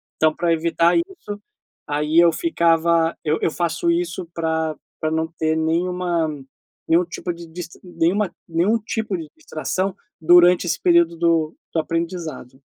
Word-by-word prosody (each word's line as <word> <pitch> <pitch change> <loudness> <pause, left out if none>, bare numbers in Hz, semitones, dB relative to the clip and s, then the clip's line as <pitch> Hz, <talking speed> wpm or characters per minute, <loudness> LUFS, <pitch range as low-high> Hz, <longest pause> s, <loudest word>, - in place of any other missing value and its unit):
Então 155 0 +3
para 170 0 +1
evitar 170 +1 +2
isso 335 - -4 0.5
aí 150 +2 0
eu 170 -1 +6
ficava 170 - +2
eu 155 +1 +2
eu 160 - +1
faço 170 0 0
isso 175 +1 -2
pra 160 -1 -1 0.3
pra 155 0 0
não 160 0 0
ter 160 0 +1
nenhuma 170 0 0 0.6
nenhum 170 +2 +4
tipo 175 0 -5
de 170 0 -10
dist 170 +1 -8
nenhuma 175 +2 0 0.2
nenhum 180 +8 +1
tipo 215 -2 -3
de 160 -2 -7
distração 190 - -3 0.3
durante 175 +2 +6
esse - - -1
período 170 -1 +4
do 165 -2 +1 0.2
do 165 - +1
aprendizado. 165 -6 -5
170 Hz, 145 wpm, -21 LUFS, 160-180 Hz, 0.6 s, eu